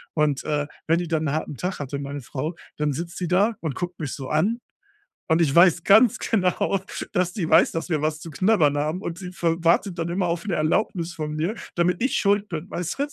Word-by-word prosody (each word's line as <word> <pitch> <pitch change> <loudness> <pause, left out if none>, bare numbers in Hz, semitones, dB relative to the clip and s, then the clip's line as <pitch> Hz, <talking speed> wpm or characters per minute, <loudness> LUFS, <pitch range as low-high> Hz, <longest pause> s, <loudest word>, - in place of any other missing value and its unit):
Und, 150 -3 +1
äh, 145 -1 -1 0.2
wenn 165 - +4
die 175 0 -2
dann 160 -2 0
'n - - 0
harten 155 -2 -3
Tag 180 +9 -3
hatte, 140 0 -4
meine 140 0 -5
Frau, 150 +7 -4 0.2
dann 150 -2 0
sitzt 170 +5 -5
die 180 - -2
da 200 +6 +2
und 155 -5 -3
guckt 175 -1 -5
mich 145 -4 -4
so 135 -2 -6
an. 195 +10 +1 0.7
Und 160 +1 +4
ich 145 -4 +1
weiß 170 -1 +5
ganz 220 +3 +6
genau, 190 -1 +1 0.3
dass 180 -3 0
die 175 -6 -2
weiß, 160 +2 +5
dass 165 +2 -4
wir 155 - +1
was 155 0 -1
zu 165 0 -9
knabbern 155 -4 +3
haben. 155 +6 -2
Und 170 +1 -5
sie 180 -2 -7
f 180 - -13 0.2
wartet 170 +2 +2
dann 165 0 -1
immer 180 +2 0
auf 170 +3 -2
'ne 195 - 0
Erlaubnis 170 +1 0
von 150 -2 -4
mir, 170 +8 -1 0.2
damit 175 +4 +1
ich 265 - +1
Schuld 205 0 +2
bin, 165 0 -6
weißt 175 - -4
du? 285 - +1
170 Hz, 235 wpm, -24 LUFS, 155-185 Hz, 0.7 s, ganz